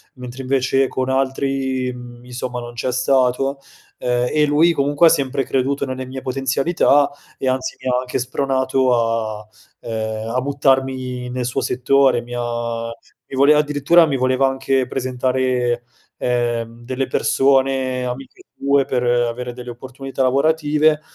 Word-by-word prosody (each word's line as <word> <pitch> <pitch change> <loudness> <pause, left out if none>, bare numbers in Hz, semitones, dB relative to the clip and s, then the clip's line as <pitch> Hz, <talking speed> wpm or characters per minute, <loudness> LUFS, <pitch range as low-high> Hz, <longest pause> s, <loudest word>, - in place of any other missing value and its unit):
mentre, 125 0 -8
invece, 135 0 +1
con 130 0 -2
altri, 135 -1 -1
mhmm, 120 0 -11
insomma, 125 0 -5
non 120 0 -8
c'è 120 +2 -2
stato. 130 +1 +1 0.4
Ehm, 125 0 0
e 150 0 +3
lui 155 +4 +4
comunque 145 +2 +3
ha - - +7
sempre 135 -4 0
creduto 135 +2 0
nelle 130 -1 -5
mie 130 +1 -6
potenzialità, 135 +3 +2 0.3
e, 130 - -3
anzi, 130 0 -1
mi - - -7
ha 125 0 +2
anche 125 0 -3
spronato 130 0 +1 0.5
a 105 - -14 0.4
ehm, 110 0 -3
a 130 - +2
buttarmi 130 -2 0
nel 125 0 -3
suo 120 - -1
settore. 130 0 +2
Mi 120 0 -10
ha 120 -1 -3 0.4
mi - - -8
voleva 145 +2 +6
addirittura 150 +3 +4
mi 140 -4 -1
voleva 130 +1 +2
anche 135 0 0
presentare, 125 -1 -1 0.3
ehm, 120 -1 -2
delle 130 +2 -2
persone 135 -1 +1
amiche 125 +1 -7
sue 140 0 +2
per 125 -1 -1
avere 120 0 0
delle 125 0 -8
opportunità 130 +3 -7
lavorative, 150 +3 +2
130 Hz, 145 wpm, -20 LUFS, 125-135 Hz, 0.5 s, ha